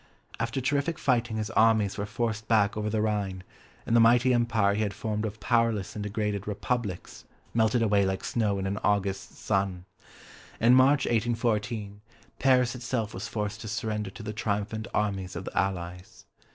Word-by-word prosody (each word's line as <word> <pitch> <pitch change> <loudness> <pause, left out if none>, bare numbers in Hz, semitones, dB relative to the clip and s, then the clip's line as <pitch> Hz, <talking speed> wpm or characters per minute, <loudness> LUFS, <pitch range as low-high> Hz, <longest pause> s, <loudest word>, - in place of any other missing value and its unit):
After 115 +3 -1
terrific 145 +4 0
fighting 120 -4 +1
his 110 0 -3
armies 110 -3 +3
were 100 0 -3
forced 110 0 -2
back 105 -3 +3
over 105 0 -2
the 105 0 0
Rhine, 100 -4 -2 0.4
and 115 - +1
the - - +7
mighty 120 +3 +5
Empire 115 -4 +2
he 105 - -1
had 100 -3 -1
formed 105 0 -2
of 110 +1 -8
powerless 115 -3 +1
and 105 - -4
degraded 105 -1 -2
"Republics" 105 -1 -3 0.3
melted 115 +1 +2
away 100 -2 +3
like 95 0 -1
snow 105 -4 0
in 95 - -3
an 100 +2 -2
August 100 -2 -1
sun. 95 -3 -1 0.7
In 120 +2 +5
March 130 +2 +5
1814, 110 -3 -1 0.4
Paris 125 -2 +3
itself 120 -3 -3
was 95 - -5
forced 105 0 -4
to 110 - -7
surrender 105 -2 -2
to 105 +4 -10
the 105 0 -4
triumphant 110 +1 -2
armies 95 -3 -1
of 90 +2 -5
the - - -7
Allies. 90 -1 -3
110 Hz, 170 wpm, -28 LUFS, 100-115 Hz, 0.7 s, the